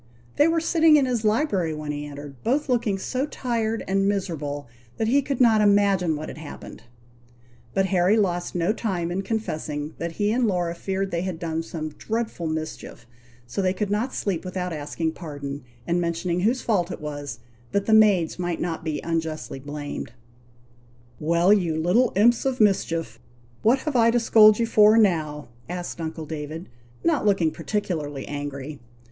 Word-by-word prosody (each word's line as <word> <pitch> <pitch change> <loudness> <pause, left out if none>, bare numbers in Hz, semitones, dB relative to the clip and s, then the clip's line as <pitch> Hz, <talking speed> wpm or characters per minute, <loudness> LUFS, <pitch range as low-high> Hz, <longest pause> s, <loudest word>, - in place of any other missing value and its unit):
They 295 - +6
were 330 0 +2
sitting 325 -1 +4
in 285 -3 +4
his 245 -3 -1
library 210 - +1
when 150 -1 -4
he 145 0 -5
entered, 145 -2 -10
both 275 +5 0
looking 230 -5 +1
so 255 +8 -2
tired 230 -5 -2
and 195 +1 +2
miserable 150 -9 -2 0.3
that 220 - 0
he 280 +4 +4
could 275 -1 -3
not 225 -4 +5
imagine 200 -5 +3
what 155 +1 -5
had - - -8
happened; 155 -2 -10 0.9
but 195 - +3
Harry 190 +2 +3
lost 175 -5 0
no 175 +4 +1
time 180 -7 -2
in 185 +2 -1
confessing 155 -8 -3
that 170 0 -3
he 205 +4 0
and 240 +1 +2
Laura 175 -4 0
feared 195 +2 -3
they 170 - -1
had 185 -2 -3
done 165 -1 -2
some 160 -1 -5
dreadful 220 +2 -3
mischief, 155 -6 -5 0.4
so 120 +11 -3
they 185 0 +1
could 205 0 -2
not 225 +6 0
sleep 190 -5 -2
without 180 -1 -3
asking 155 +2 -2
pardon, 145 -4 -7 0.2
and 175 +3 +1
mentioning 170 +1 -1
whose 235 +7 +1
fault 190 -6 +1
it - - -6
was, 145 -5 -6 0.3
that 200 0 0
the 220 - +2
maids 200 -7 +4
might 175 -2 -2
not 165 -2 -3
be 155 -2 -2
unjustly 160 -4 -3
blamed. 145 -3 -6 1.1
"Well, 170 +5 +4
you 175 -6 +1
little 220 +10 +3
imps 230 +4 +4
of 265 -1 -1
mischief! 190 -6 +1 0.4
what 235 +5 +4
have 305 -3 -3
I 230 -1 +5
to 240 +1 +3
scold 215 -2 +6
you 235 - +1
for 215 -1 +6
now?" 155 - +1 0.2
asked 175 -1 -5
uncle 160 0 -5
David, 155 +3 -6 0.3
not 325 -4 +2
looking 195 -6 +2
particularly 155 -7 -3
angry. 145 0 -5
180 Hz, 175 wpm, -24 LUFS, 160-215 Hz, 1.1 s, They